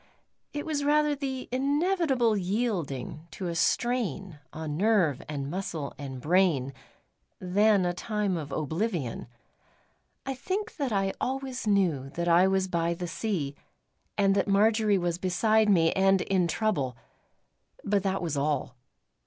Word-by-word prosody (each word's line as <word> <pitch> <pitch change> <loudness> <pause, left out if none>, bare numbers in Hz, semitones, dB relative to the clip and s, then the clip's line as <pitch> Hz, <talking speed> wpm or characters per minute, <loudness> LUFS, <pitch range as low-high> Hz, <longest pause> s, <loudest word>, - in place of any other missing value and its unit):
It 290 0 -4
was 300 -3 -1
rather 300 +1 +3
the 270 -2 -4
inevitable 280 - +2
yielding 180 - -2
to 185 - -5
a - - -2
strain 195 - 0
on 155 -2 -5
nerve 185 - +2
and 140 -2 -3
muscle 165 -3 -4
and 135 -2 -7
brain, 155 -4 +2 0.7
than 200 +1 +3
a 175 - 0
time 210 0 -1
of 150 -4 -5
oblivion. 160 - -2 1.0
I 270 - -2
think 385 - -4
that 280 -5 -1
I 195 -2 +1
always 265 -2 -3
knew 175 -10 +2
that 170 0 -2
I 175 +2 +5
was 190 0 +1
by 170 -1 0
the 175 +1 -5
sea, 165 -6 -2 0.6
and 195 -1 +4
that 195 +1 +1
Marjory 210 +1 +3
was 175 -1 -1
beside 215 +4 +2
me 165 -5 +4
and 195 -1 +3
in 185 -2 +1
trouble; 165 - -1 0.9
but 200 0 +1
that 195 -1 -1
was 160 -4 -2
all. 140 -3 -1
195 Hz, 140 wpm, -28 LUFS, 165-225 Hz, 1.0 s, I